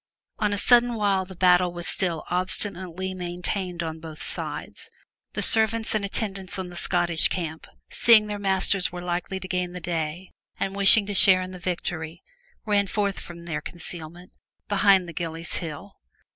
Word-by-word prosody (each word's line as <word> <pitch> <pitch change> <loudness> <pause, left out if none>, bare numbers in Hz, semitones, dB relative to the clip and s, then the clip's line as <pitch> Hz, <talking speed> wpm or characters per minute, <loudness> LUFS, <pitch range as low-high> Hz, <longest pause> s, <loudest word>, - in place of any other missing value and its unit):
On 210 -1 +1
a 205 - -1
sudden 240 +3 +4
while 200 -3 +1
the 190 0 -11
battle 180 0 +4
was 175 -1 -5
still 170 -4 0
obstinately 185 0 -1
maintained 180 0 -3
on 160 -1 -5
both 160 -1 -9
sides, - - -4 0.4
the - - -1
servants 220 0 +3
and 215 -2 0
attendants 195 -2 -4
on 185 -1 -4
the 175 - -11
Scottish 175 -2 +3
camp, 160 -3 -5 0.2
seeing 225 -2 +6
their 210 -1 -4
masters 195 -1 +1
were 175 0 -7
likely 180 +2 -3
to 185 - -7
gain 180 -1 -2
the 180 - -6
day, 170 +1 -4 0.3
and 195 0 -2
wishing 200 +1 +6
to 205 - -4
share 185 -1 +6
in 185 - -7
the 185 - -9
victory, 170 -2 -4 0.4
ran 205 -2 +2
forth 200 0 -1
from 170 -1 -10
their 155 -3 -3
conceal 170 -2 -7
ment 175 +2 -15 0.4
behind 195 -2 +4
the 170 - -8
Gillies' 165 0 -4
Hill. 165 +4 -7
185 Hz, 170 wpm, -25 LUFS, 175-200 Hz, 0.4 s, seeing